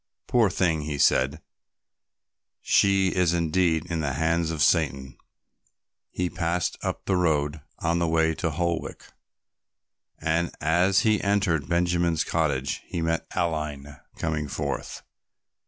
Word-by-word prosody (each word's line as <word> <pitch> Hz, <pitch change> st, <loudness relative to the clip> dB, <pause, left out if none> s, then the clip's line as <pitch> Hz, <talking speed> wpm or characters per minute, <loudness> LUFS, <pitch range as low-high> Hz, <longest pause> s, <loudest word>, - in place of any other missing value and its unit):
"Poor 115 Hz, -4 st, +3 dB
thing," 85 Hz, -4 st, +1 dB
he 75 Hz, -1 st, -4 dB
said, 65 Hz, 0 st, +2 dB, 1.2 s
"she 95 Hz, -1 st, +3 dB
is 90 Hz, -2 st, +1 dB
indeed 85 Hz, -1 st, +1 dB
in 85 Hz, -2 st, -3 dB
the 70 Hz, -3 st, -1 dB
hands 80 Hz, +3 st, 0 dB
of 80 Hz, -1 st, 0 dB
Satan." 70 Hz, -7 st, +1 dB, 0.9 s
He 90 Hz, -, -2 dB
passed 85 Hz, 0 st, -1 dB
up -, -, -4 dB
the 95 Hz, -, +1 dB
road 75 Hz, -4 st, 0 dB, 0.2 s
on 85 Hz, +1 st, 0 dB
the 85 Hz, -, +1 dB
way 80 Hz, 0 st, +2 dB
to 80 Hz, -, -2 dB
Holwick 85 Hz, +2 st, -3 dB, 1.1 s
and, 85 Hz, +2 st, 0 dB
as 90 Hz, +5 st, +3 dB
he 110 Hz, -3 st, +2 dB
entered 95 Hz, -7 st, 0 dB
Benjamin's 85 Hz, -1 st, +1 dB
cottage, 70 Hz, -5 st, -1 dB
he -, -, -4 dB
met 80 Hz, 0 st, -1 dB
Aline 75 Hz, -4 st, -3 dB, 0.2 s
coming 75 Hz, -2 st, -2 dB
forth. -, -, -4 dB
80 Hz, 125 wpm, -25 LUFS, 75-90 Hz, 1.2 s, Poor